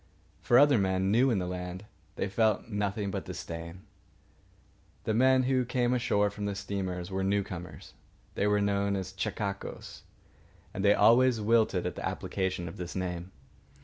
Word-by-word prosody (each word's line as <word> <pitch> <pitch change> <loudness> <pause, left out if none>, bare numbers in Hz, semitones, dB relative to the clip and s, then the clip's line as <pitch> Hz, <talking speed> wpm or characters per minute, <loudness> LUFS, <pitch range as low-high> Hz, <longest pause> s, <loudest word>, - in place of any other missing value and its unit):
For 120 - +4
other 140 -3 +6
men, 95 0 +1
new 125 +5 +4
in 115 - +2
the 90 - -1
land, 90 +2 -5 0.3
they - - -2
felt 110 +2 +1
nothing 105 -1 -2
but - - -4
disdain. 85 +2 -7 1.2
The 110 - -1
men 130 +3 +4
who 130 0 +2
came 120 0 0
ashore 105 -4 +1
from 105 0 -5
the 100 -1 -2
steamers 95 -3 -4
were 95 0 -1
newcomers. 95 -3 -3 0.4
They 100 - 0
were 105 0 +2
known 100 0 +1
as 95 -1 -4
chechaquos, 100 +1 -5 0.7
and 95 - -3
they 100 0 +5
always 120 0 +5
wilted 110 -4 +2
at 90 - -2
the - - -7
application 95 -2 -2
of 80 - -8
the 90 -1 -5
name. 90 0 -4
100 Hz, 160 wpm, -29 LUFS, 95-110 Hz, 1.2 s, other